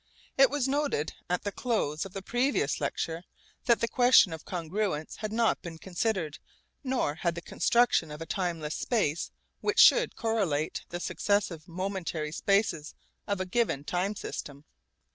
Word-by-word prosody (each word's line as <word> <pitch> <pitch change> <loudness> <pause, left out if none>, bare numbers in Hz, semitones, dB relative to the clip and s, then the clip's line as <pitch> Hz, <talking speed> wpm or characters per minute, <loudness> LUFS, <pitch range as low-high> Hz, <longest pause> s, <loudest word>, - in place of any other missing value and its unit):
It 270 0 +6
was 285 -2 0
noted 280 - 0 0.2
at 180 - 0
the 205 - -2
close 195 - -1
of 185 - -18
the 195 - -6
previous 245 +7 0
lecture 165 0 -2 0.4
that 235 -2 +4
the 230 - +2
question 245 -8 +5
of 160 - -8
congruence 175 -2 -3
had 215 -1 -4
not 230 0 +2
been 165 -2 -8
considered, 175 -2 -2 0.4
nor 255 - 0
had 170 +2 -1
the - - -4
construction 235 -8 +2
of 150 0 -8
a 165 - -5
timeless 165 -3 -2
space 170 - 0 0.3
which 420 - -1
should - - +6
correlate 195 -10 -1
the 175 - -4
successive 185 -4 -1
momentary 175 -4 -3
spaces 180 -4 0 0.3
of 200 -2 -1
a 185 - -1
given 185 - 0
time 180 +6 -1
system. 145 -6 -7
185 Hz, 155 wpm, -29 LUFS, 160-225 Hz, 0.4 s, It